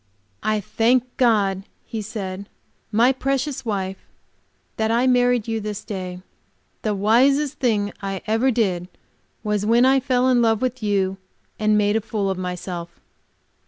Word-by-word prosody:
"I 215 0 +1
thank 230 +5 +2
God," 205 -6 +2 0.2
he 225 - -5
said, 200 -2 -6 0.4
"my 235 +4 +4
precious 270 +1 -2
wife, 195 -4 -3 0.8
that 220 - +1
I 235 +3 +2
married 245 -2 +3
you 225 -1 -1
this 210 -1 -5
day. 185 -3 -6 0.6
The 215 -2 -1
wisest 270 +8 +3
thing 210 -5 +1
I 195 -1 -4
ever 225 +4 +2
did 190 -8 0 0.6
was 210 -1 0
when 230 +4 +4
I 270 +1 +5
fell 255 0 +1
in 250 -2 +4
love 225 -2 +3
with 255 0 -2
you 195 -2 0 0.4
and 215 -1 +3
made 205 0 +2
a 225 - +2
fool 210 -3 -2
of 185 - -4
myself!" 180 -1 -5
215 Hz, 150 wpm, -22 LUFS, 195-245 Hz, 0.8 s, I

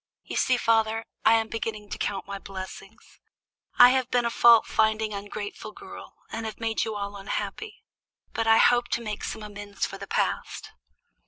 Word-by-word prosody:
You - - -7
see, 255 -1 +2
father, 225 -1 +1 0.2
I 225 - +6
am 225 -1 +1
beginning 215 -2 -5
to - - -5
count 200 -1 -2
my 200 0 -6
blessings. 195 +3 -10 0.6
I 245 - +10
have 260 -1 +1
been 245 -1 +1
a 235 - 0
fault 235 -1 +6
finding, 220 0 +1
ungrateful 205 +1 -6
girl, - - -11 0.2
and 225 0 -4
have 220 - -8
made 225 -1 0
you 220 -1 -4
all 200 0 -4
unhappy; 420 - -5 0.5
but 225 0 -1
I 225 0 +6
hope 240 +1 +4
to 235 - -9
make 210 -2 -5
some 220 - -5
amends 205 -1 -5
for - - -8
the - - -8
past." - - -2
220 Hz, 180 wpm, -26 LUFS, 205-230 Hz, 0.6 s, I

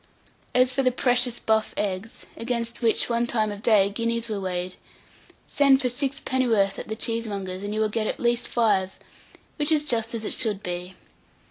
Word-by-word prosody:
As 255 0 +5
for 270 - +1
the 255 - +4
precious 245 -1 +1
buff 220 0 0
eggs, 200 +2 -3
against 235 0 -3
which, 225 -2 +2
one 235 0 0
time 215 -3 0
of 205 0 -7
day, 215 -4 +5
guineas 230 +2 -1
were 210 -2 -2
weighed, 180 -1 -3 0.7
send 275 -2 +4
for 255 -3 0
sixpenn'orth 245 -6 0
at - - -7
the 220 - -3
cheesemonger's, 205 -5 -3
and 205 +1 -4
you 215 - -2
will 215 - +3
get 215 0 -1
at - - -3
least 240 0 +1
five; 200 -5 +1 0.6
which 295 0 0
is 300 -1 +2
just 230 -4 -1
as 220 -1 -4
it - - -2
should 210 -5 0
be. 180 +1 -5
230 Hz, 180 wpm, -25 LUFS, 205-245 Hz, 0.7 s, As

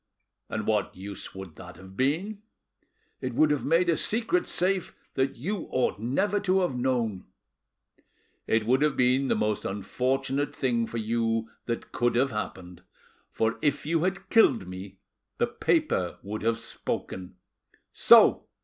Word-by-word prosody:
"And 110 -1 -3
what 105 -3 0
use 100 +1 -8
would 95 -4 -9
that 90 -1 -10
have 95 0 -13
been?" 175 - -1 0.8
"It - - -3
would 155 -1 +4
have 145 - 0
made 165 +4 +3
a 170 - +3
secret 235 - +1
safe 185 0 0 0.2
that 135 0 0
you 185 - -4
ought 125 -5 0
never 190 - 0
to 190 -1 +2
have 175 -8 0
known." 120 -6 -1 1.2
"It 110 -1 +2
would 130 +4 +3
have 150 -2 +2
been 130 +2 +3
the - - +2
most 105 -1 0
unfortunate 130 +7 -1
thing 120 -4 0
for 115 - -5
you 115 0 -1
that 115 -1 -4
could 120 0 +1
have 130 +3 +2
happened, 90 -5 -6 0.5
for 110 0 -1
if 145 -1 0
you 165 +1 +1
had 195 +1 -2
killed 125 - +4
me 95 +1 -8 0.4
the - - +3
paper 90 -2 0
would 105 +2 -5
have 115 +1 +1
spoken. 95 -5 -5 0.6
So! - - +6
125 Hz, 150 wpm, -27 LUFS, 105-150 Hz, 1.2 s, So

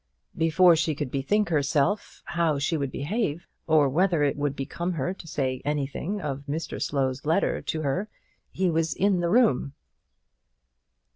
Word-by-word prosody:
Before 165 +2 +5
she 160 -1 0
could 145 -3 -4
bethink 205 +10 +1
herself 150 +5 0
how 165 -4 0
she 140 +4 0
would 140 -3 -1
behave 170 - -2
herself, - - -31 0.2
or 155 -3 +5
whether 170 +2 +2
it 140 - +1
would 145 -1 -1
become 170 +6 -3
her 165 +3 -2
to 180 - -12
say 130 -4 -2
anything 150 +7 -2
of 140 -6 -4
Mr 160 +3 -4
Slow's 135 -2 -1
letter 160 +6 +1
to 155 -1 -3
her, 180 +10 -1 0.4
he 185 -2 0
was 165 0 0
in 195 -1 +2
the 170 -1 0
room. 205 - +3
155 Hz, 160 wpm, -26 LUFS, 140-180 Hz, 0.4 s, Before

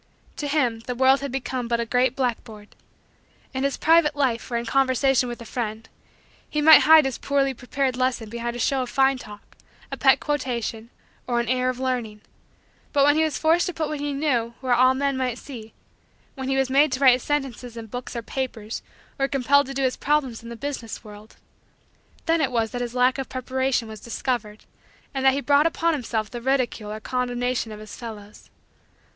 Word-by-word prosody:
To 295 - -3
him, 260 -6 +1
the 250 - -2
world 265 +2 +4
had 280 -1 -5
become 260 -2 -3
but 235 0 0
a 235 - -1
great 250 +2 +1
blackboard. 225 -5 -3 0.8
In 265 0 -2
his 275 0 0
private 320 -2 +4
life 260 -5 0
or 235 - -1
in 235 - -3
conversation 265 0 +2
with 240 - -6
a 235 - -9
friend, 225 -1 -4 0.6
he 300 - -1
might 315 +1 +9
hide 315 -1 +7
his 265 -2 -3
poorly 275 -1 +1
prepared 260 +1 -2
lesson 255 -3 -1
behind 235 +2 -4
a - - -6
show 265 +2 +1
of 250 - -4
fine 270 +1 +2
talk, 210 -3 -13 0.4
a - - -4
pet - - +5
quotation, 240 -6 -3 0.4
or 240 -1 +1
an 235 - -1
air 255 +1 +1
of 255 0 -4
learning; 245 -5 -2 0.7
but 280 - +3
when 290 0 +5
he 315 - +3
was 315 -2 -1
forced 330 +3 +3
to 360 - -4
put 315 -2 -2
what 300 - -4
he 290 0 -2
knew 255 -5 -1
where 255 -2 0
all 255 +2 +5
men 275 0 0
might 250 -2 -1
see 230 -6 -10 0.6
when 265 -1 -5
he 270 - +1
was 270 -1 +2
made 280 +2 +4
to 255 - -1
write 265 -3 +7
his 250 - -1
sentences 255 -5 -3
in 230 - -6
books 245 +3 -7
or 235 - -4
papers 225 -2 -4 0.4
or 275 - +2
compelled 275 0 +3
to 275 - -6
do 275 - -1
his 255 -1 0
problems 275 -5 0
in 230 - -10
the 235 - -7
business 250 -4 -6
world 210 0 -13 0.9
then 330 -1 +2
it 270 -3 +1
was 225 -2 0
that 245 - -4
his 240 0 -4
lack 250 +2 +3
of 270 - -4
preparation 260 -1 -1
was 220 -1 -9
discovered, 230 -2 -4 0.5
and 270 -1 -2
that 265 0 +5
he 280 - -1
brought 290 +2 +4
upon 330 0 0
himself 225 -6 -3
the 240 -1 -6
ridicule 250 -5 -1
or 215 - -5
condemnation 245 -1 -2
of 210 - -8
his 215 -1 -10
fellows. 215 -3 -10
255 Hz, 210 wpm, -24 LUFS, 235-275 Hz, 0.9 s, might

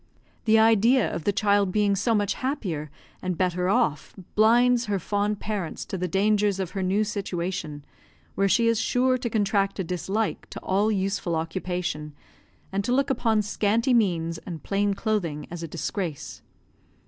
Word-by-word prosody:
The 220 0 +5
idea 225 +2 +4
of 165 - -5
the - - +3
child 200 -1 +2
being 205 0 +2
so 225 +4 +1
much 205 -2 +1
happier 190 - -3 0.3
and 180 -2 -2
better 180 0 0
off 150 -7 0 0.2
blinds 240 +3 +4
her 205 -2 0
fond 205 +2 -1
parents 200 -7 -4
to - - -5
the 180 -1 -2
dangers 200 +1 +2
of 185 -2 -3
her 195 - -3
new 190 +3 +1
situation, 180 -7 -4 0.5
where 195 0 +1
she 230 +4 +3
is 230 -1 +2
sure 255 +2 +2
to 240 -1 -2
contract 200 -2 +1
a 190 - -1
dislike 190 +5 -2
to - - -7
all 205 +3 +1
useful 195 -3 -1
occupation, 165 -2 -3 0.6
and 195 +1 -1
to 245 - -2
look 275 +2 +2
upon 225 -5 +1
scanty 220 +4 +1
means 170 -7 +1
and 165 -3 -8
plain 200 0 0
clothing 180 -10 -2
as 175 -1 -6
a 165 - -4
disgrace. 170 -1 -4
200 Hz, 165 wpm, -25 LUFS, 180-220 Hz, 0.6 s, The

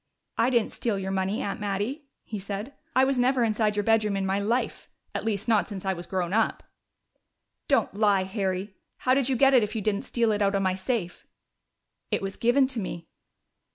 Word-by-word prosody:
"I 235 - +3
didn't 235 -4 +1
steal 225 -4 -2
your 190 0 -3
money, 190 +2 -1
Aunt 200 - -3
Mattie," 210 +9 -2 0.2
he 215 - -6
said. 200 +7 -5 0.2
"I 260 - +6
was 265 -1 +2
never 250 0 +3
inside 215 -1 +1
your 205 - 0
bedroom 215 -2 +2
in 195 - -1
my 190 +1 +1
life 230 +5 -1 0.2
at - - -3
least, 215 -1 -2
not 220 -3 +3
since 195 -2 -7
I 190 - +1
was 175 -1 -8
grown 185 -2 -2
up!" 225 +1 +1 1.0
"Don't - - +2
lie, 205 -2 +3
Harry! 190 0 -2 0.2
How 255 - +2
did 270 -1 +2
you 265 - +2
get 270 +2 +5
it 255 - +7
if 210 +1 -2
you 220 - -1
didn't 205 -1 0
steal 230 -2 +1
it 210 0 0
out 200 0 +2
of 195 - +1
my 185 -1 +2
safe?" 190 -1 -3 0.8
"It - - -1
was 195 0 -4
given 245 +4 +3
to 250 -4 -1
me." 170 -4 -6
210 Hz, 210 wpm, -27 LUFS, 195-235 Hz, 1.0 s, it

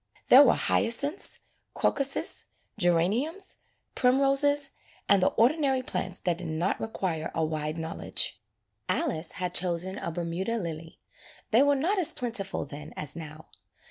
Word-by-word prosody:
There 260 - +10
were 265 -5 +5
hyacinths, 285 +10 0 0.3
crocuses, 275 -1 0 0.3
geraniums, 215 - 0 0.4
primroses, 275 +2 +2 0.4
and 200 -2 +5
the - - +4
ordinary 265 +1 +2
plants 185 -6 -4
that 175 -1 -1
did 180 - -6
not 160 +4 -1
require 180 -7 -3
a 160 - +1
wide 155 0 -3
knowledge. 160 -8 0 0.5
Alice 160 +1 -1
had 180 -2 -3
chosen 180 +2 0
a 170 - -4
Bermuda 175 +6 -3
lily. 165 -4 -6 0.5
They 230 +3 +5
were 285 0 +4
not 355 +9 0
as 345 - +2
plentiful 220 -9 -1
then 145 +2 -10
as 150 -1 -4
now. 155 -1 -10
190 Hz, 135 wpm, -28 LUFS, 165-270 Hz, 0.5 s, There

